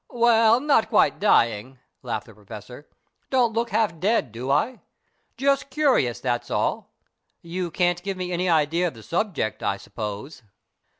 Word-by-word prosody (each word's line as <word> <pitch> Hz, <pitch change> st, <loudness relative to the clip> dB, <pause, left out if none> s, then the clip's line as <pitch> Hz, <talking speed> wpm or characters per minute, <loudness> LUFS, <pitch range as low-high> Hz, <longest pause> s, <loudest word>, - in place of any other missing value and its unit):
"Well, 230 Hz, -2 st, +4 dB
not 275 Hz, -5 st, +2 dB
quite -, -, +3 dB
dying," 120 Hz, -, +2 dB, 0.2 s
laughed 115 Hz, -4 st, -4 dB
the 115 Hz, -, -15 dB
Professor. 105 Hz, +6 st, -11 dB, 0.4 s
"Don't 245 Hz, -4 st, +2 dB
look 230 Hz, +1 st, -1 dB
half 210 Hz, -6 st, 0 dB
dead, 200 Hz, -, +1 dB
do 120 Hz, +4 st, -6 dB
I? 185 Hz, -, +1 dB, 0.6 s
Just 275 Hz, +1 st, +1 dB
curious, 260 Hz, -, +1 dB
that's 120 Hz, -2 st, -2 dB
all. -, -, -2 dB, 0.5 s
You 175 Hz, +1 st, -4 dB
can't 175 Hz, +1 st, 0 dB
give 195 Hz, 0 st, -4 dB
me 180 Hz, -1 st, -4 dB
any 180 Hz, +1 st, 0 dB
idea 165 Hz, +2 st, +2 dB
of 160 Hz, -, -6 dB
the 110 Hz, -, -13 dB
subject, 170 Hz, -, -2 dB
I -, -, -1 dB
suppose?" 105 Hz, +7 st, -7 dB
175 Hz, 155 wpm, -24 LUFS, -, 0.6 s, Well